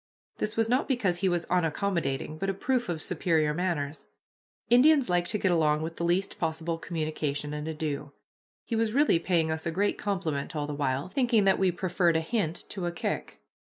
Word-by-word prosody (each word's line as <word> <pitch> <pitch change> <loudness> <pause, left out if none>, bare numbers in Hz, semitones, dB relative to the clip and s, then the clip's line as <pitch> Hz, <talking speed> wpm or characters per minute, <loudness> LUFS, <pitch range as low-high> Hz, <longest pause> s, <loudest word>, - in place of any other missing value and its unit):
This 215 +1 -2
was 225 -1 +3
not 250 +4 +1
because 220 -10 +1
he 190 - +2
was 175 -1 0
unaccommodating, 165 -4 -1
but 195 - -1
a 195 - -1
proof 250 +3 0
of 165 -2 -2
superior 160 -3 +1
manners. 150 -4 -2 0.6
Indians 260 - +5
like 175 0 +2
to 210 - -1
get 190 -2 +1
along 155 -2 +2
with 165 +1 -5
the - - -3
least 180 +3 0
possible 165 +1 -2
communication 155 -3 -3
and 150 +1 -4
ado. 150 -2 -3 0.5
He 230 - -2
was 225 -1 +1
really 285 - +4
paying 165 -3 +1
us 160 +1 -3
a - - 0
great 200 +5 0
compliment 165 -6 -2
all 150 -1 -1
the 150 - -4
while, 140 -1 -1
thinking 235 +1 +2
that 195 -1 +3
we 190 -1 +3
preferred 175 -1 +1
a - - 0
hint 170 -2 -1
to 185 -4 -3
a - - -1
kick. 170 - -4
170 Hz, 195 wpm, -28 LUFS, 155-195 Hz, 0.6 s, Indians